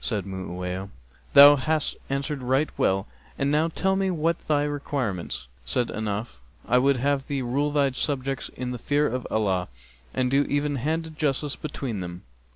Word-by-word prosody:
Said 105 -5 -1
Mu'awiyah, 95 0 -5 0.4
'Thou 145 +1 +10
hast 155 +3 0
answered 140 +1 -2
right 130 +4 +1
well 95 0 +1 0.3
and 140 +1 +1
now 155 +2 +3
tell 190 +3 0
me 190 0 +1
what 165 -1 0
be - - -27
thy 145 -1 +3
requirements?' 130 - -3 0.2
Said 115 - 0
Ahnaf, 105 - -4 0.3
'I 125 - +4
would 135 +1 +3
have 140 +1 0
thee 140 -2 -2
rule 140 +5 0
thy 140 -2 +2
subjects 135 0 -1
in 125 -1 -5
the 125 - -5
fear 145 +4 +1
of 125 -2 -2
Allah 95 -4 0 0.4
and 130 -1 0
do 140 +1 +4
even 145 0 0
handed 160 +4 -2
justice 145 -1 0
between 135 -7 -4
them.' 90 -1 -6
135 Hz, 170 wpm, -26 LUFS, 110-145 Hz, 0.4 s, Thou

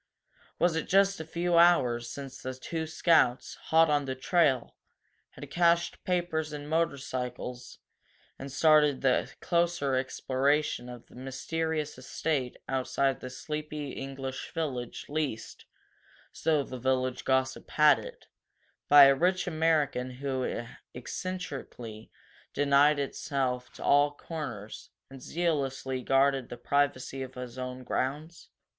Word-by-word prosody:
Was 175 -2 +2
it 165 - -2
just 195 0 +3
a - - -4
few 170 +1 +1
hours 125 -9 +4
since 135 -1 -8
the 130 0 -5
two 160 +5 -4
Scouts, 160 -6 +2 0.2
hot 165 +1 +6
on 145 -2 +1
the 130 -1 -3
trail, 135 -2 +1 0.6
had - - -10
cached 170 0 +2
papers 175 -4 -1
and 145 -1 -7
motorcycles 130 -6 -3 0.6
and 135 +1 -7
started 150 -1 +4
the 130 -2 +2
closer 170 -5 +1
exploration 130 0 0
of 120 -1 -10
that - - -21
mysterious 150 +3 -3
estate 130 -1 -2
outside 135 0 0
the 130 - -7
sleepy 150 +1 -5
English 135 -1 -6
village, 130 -7 -3
leased, 145 -7 -4 0.7
so 155 -3 +1
the 130 -1 -8
village 130 0 0
gossip 130 0 0
had 150 -2 +5
it, - - -10 0.6
by 145 0 +10
a 135 0 +8
rich 180 +6 +1
American 155 -6 +1
who 130 -2 -3 0.3
eccentrically 125 - -6 0.5
denied 145 +1 +4
himself 135 -3 -2
to - - -9
all 145 +1 +5
comers 145 -8 -7 0.2
and 135 -1 -11
zealously 135 -5 -1
guarded 135 0 +2
the 120 - -7
privacy 135 -1 0
of 130 0 -7
his 125 -1 -7 0.3
grounds? 150 +7 -3
140 Hz, 125 wpm, -29 LUFS, 130-160 Hz, 0.7 s, by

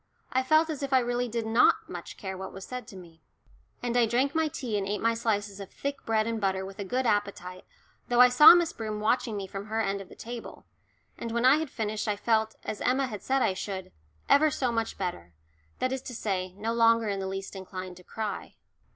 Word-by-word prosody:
I 260 - +3
felt 310 +4 +3
as 295 - -5
if 275 -1 -2
I - - +7
really 245 0 -1
did 230 -1 -3
not 225 +2 +4
much - - -8
care 190 -2 -5
what 190 0 -7
was 195 0 -9
said 250 -3 -7
to 210 - -11
me. 170 -3 -13 0.6
And 240 -1 -1
I 240 -2 +4
drank 260 +5 +1
my 320 -1 +2
tea 250 -7 -4
and 195 -1 -1
ate 205 +1 -1
my 230 0 +2
slices 205 -3 -1
of 195 -1 -8
thick 280 0 -5
bread 220 -1 +2
and 225 -1 -2
butter 190 -1 0
with 195 +1 -10
a - - -2
good 250 +7 -1
appetite, 200 -4 -1 0.4
though 240 0 +1
I 250 - +10
saw 300 +7 +10
Miss 345 -2 +1
Broom 215 -2 -4
watching 220 0 0
me 195 - -4
from 195 +2 -7
her 220 +1 -2
end 200 -2 -1
of 190 - -12
the - - -13
table; 235 0 -8 0.5
and 235 - -4
when 235 +2 0
I 265 +3 +7
had 315 -2 -3
finished 215 -2 -3
I 210 - +1
felt, 220 +1 +1
as 210 - -5
Emma 265 +2 +2
had 215 -6 -6
said 265 0 +1
I 190 - +2
should, 190 0 -5 0.4
"ever 310 +2 +5
so 265 -5 -1
much 225 -1 -2
better" 85 - -5 0.4
that 255 - -1
is 265 -1 -2
to 250 -2 -8
say, 185 -4 -2
no 215 +4 -3
longer 230 -1 +4
in 200 -1 -1
the 190 - -3
least 195 +1 -5
inclined 185 -1 -7
to 180 - -14
cry. 215 +2 -5
220 Hz, 235 wpm, -28 LUFS, 195-245 Hz, 0.6 s, I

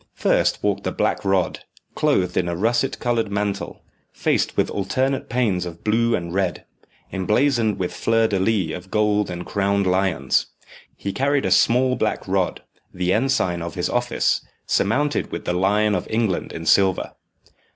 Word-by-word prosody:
First - - +1
walked - - 0
the - - -1
Black - - -1
Rod, 95 -2 +1 0.3
clothed 90 -1 +1
in 90 - +1
a 85 - -2
russet 120 +8 0
coloured 115 -3 0
mantle, 100 0 -3 0.3
faced - - 0
with - - +1
alternate 130 +6 -1
panes 110 -7 +1
of 85 -1 -8
blue 115 +2 +2
and 85 -1 -4
red, 95 -2 -1 0.5
emblazoned 110 +3 +1
with 90 -1 -3
flower 115 0 +2
de 100 -3 0
luces 95 -4 0
of 90 +1 -13
gold 105 -1 +1
and 90 0 -5
crowned 100 0 0
lions. 90 -7 +1 0.5
He 100 - -4
carried 140 +1 +1
a 95 - 0
small 125 +6 +4
black - - -2
rod, - - -1 0.3
the 90 0 0
ensign 110 -8 +1
of 85 -1 -5
his - - -1
office, - - +1 0.2
surmounted 145 +8 0
with - - -5
the 90 - 0
lion 105 +4 +2
of 90 - -2
England 110 -4 -1
in 80 - -7
silver. 95 0 +3
100 Hz, 160 wpm, -22 LUFS, 90-115 Hz, 0.5 s, small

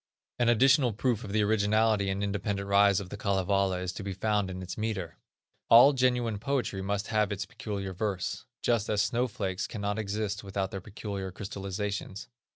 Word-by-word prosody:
An 120 -1 +3
additional 130 +1 +4
proof 120 +1 0
of 100 - -6
the 105 +1 +2
originality 105 -1 +2
and 95 +1 -1
independent 100 0 -2
rise 100 -1 +5
of 95 -3 -7
the 105 - -6
Kalevala 95 -2 +1
is 90 0 -3
to - - -7
be 100 0 -4
found 105 0 0
in 95 0 -6
its 90 - -6
metre. 105 -6 -4 0.5
All 125 +5 +9
genuine 125 -4 +1
poetry 120 -5 -1
must 100 +1 -2
have 105 -2 +1
its 100 -1 -3
peculiar 100 -2 -5
verse, 95 -2 -3 0.2
just 115 -3 +1
as 105 0 +2
snow 120 +3 0
flakes 100 -6 -3
cannot 105 -1 -3
exist 105 -1 -3
without 95 0 -3
their 95 - -5
peculiar 100 -1 -6
crystalizations. 100 +2 -5
100 Hz, 175 wpm, -29 LUFS, 95-110 Hz, 0.5 s, All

